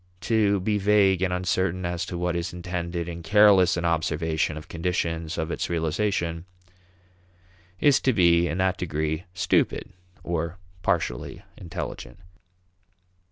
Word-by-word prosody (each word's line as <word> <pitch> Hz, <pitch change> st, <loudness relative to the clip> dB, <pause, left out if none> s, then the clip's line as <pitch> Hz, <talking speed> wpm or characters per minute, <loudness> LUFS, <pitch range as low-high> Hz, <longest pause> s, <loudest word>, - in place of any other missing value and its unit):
To 105 Hz, -3 st, +2 dB
be 105 Hz, +2 st, 0 dB
vague 100 Hz, -2 st, +3 dB
and 95 Hz, -1 st, +1 dB
uncertain 90 Hz, 0 st, -1 dB
as 85 Hz, 0 st, -2 dB
to 90 Hz, -, -5 dB
what 90 Hz, 0 st, -1 dB
is 85 Hz, 0 st, -3 dB
intended 85 Hz, -1 st, -4 dB
and 85 Hz, -1 st, -6 dB
careless 95 Hz, -1 st, +5 dB
in 85 Hz, -, -2 dB
observation 80 Hz, -1 st, 0 dB
of 75 Hz, +2 st, -9 dB
conditions 85 Hz, -1 st, -2 dB
of 80 Hz, +1 st, -2 dB
its -, -, -3 dB
realization 85 Hz, 0 st, -1 dB, 1.3 s
is 145 Hz, -2 st, +5 dB
to 130 Hz, -, +3 dB
be, 85 Hz, -5 st, +4 dB
in 85 Hz, -, -3 dB
that 95 Hz, 0 st, +1 dB
degree, 80 Hz, 0 st, -2 dB
stupid 95 Hz, -1 st, 0 dB, 0.3 s
or 85 Hz, +1 st, -3 dB, 0.2 s
partially 80 Hz, -11 st, -2 dB
intelligent. 85 Hz, -8 st, -7 dB
85 Hz, 130 wpm, -25 LUFS, 85-95 Hz, 1.3 s, careless